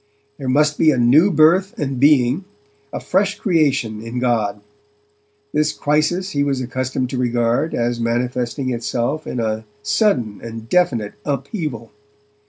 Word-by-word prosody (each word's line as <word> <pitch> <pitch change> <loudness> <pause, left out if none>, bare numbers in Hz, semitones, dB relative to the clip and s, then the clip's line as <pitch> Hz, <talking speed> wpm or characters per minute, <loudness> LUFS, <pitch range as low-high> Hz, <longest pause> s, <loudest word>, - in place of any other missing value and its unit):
There 135 -2 -3
must 150 +3 +2
be 160 - +5
a 140 - +2
new 135 +10 +5
birth 175 +4 +3
and 135 -4 -3
being, 140 +4 +3 0.5
a - - -4
fresh 195 +2 0
creation 140 - +1
in 115 +2 -6
God. 115 -5 0 0.9
This 150 0 +2
crisis 155 +6 0
he 145 -1 0
was 140 -2 0
accustomed 130 0 -3
to 130 - -3
regard 120 +4 0
as 120 0 -1
manifesting 125 +2 -1
itself 120 +5 -2
in 125 - -3
a 110 -1 -2 0.2
sudden 125 - +1
and 115 -1 -8
definite 120 -11 +1
upheaval. 140 - -4
130 Hz, 140 wpm, -19 LUFS, 120-155 Hz, 0.9 s, be